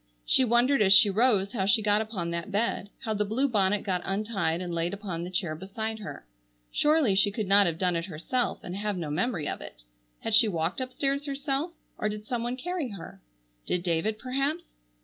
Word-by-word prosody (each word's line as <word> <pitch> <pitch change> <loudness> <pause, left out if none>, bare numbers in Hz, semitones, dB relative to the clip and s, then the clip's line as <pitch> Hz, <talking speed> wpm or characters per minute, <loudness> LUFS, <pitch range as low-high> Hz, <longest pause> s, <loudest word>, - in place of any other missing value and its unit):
She 260 - +4
wondered 245 +2 +3
as 195 -1 +6
she 200 +1 +7
rose 205 -2 +2
how 195 -5 0
she 215 +2 +4
got 210 0 +3
upon 195 -6 -4
that 170 +2 -4
bed, 205 -1 -1
how 220 - -2
the 210 0 0
blue 230 +7 0
bonnet 205 -4 +1
got 185 -2 -1
untied 195 -5 -1
and 180 -1 -4
laid 170 +3 -1
upon 185 -5 -5
the 175 - -5
chair 180 -3 -1
beside 220 +6 -5
her. 200 - -8 0.5
Surely 300 -8 +3
she 200 +2 +4
could 210 +1 -3
not 200 0 +6
have 165 -1 -2
done 180 0 +1
it 165 0 -2
herself 195 +9 -2
and 175 - -6
have 205 -1 -2
no 160 -4 -4
memory 175 -1 -1
of - - -4
it. - - -11 0.4
Had 225 - -2
she 220 +1 +7
walked 170 +3 -1
upstairs 275 +2 -2
herself, 280 +4 -2 0.3
or 210 - 0
did 210 0 -6
some 240 +1 -2
one 240 +2 -3
carry 340 -1 -3
her? 195 - -10 0.5
Did 180 -1 0
David 175 +5 0
perhaps? 275 +7 -2
210 Hz, 210 wpm, -28 LUFS, 180-245 Hz, 0.5 s, she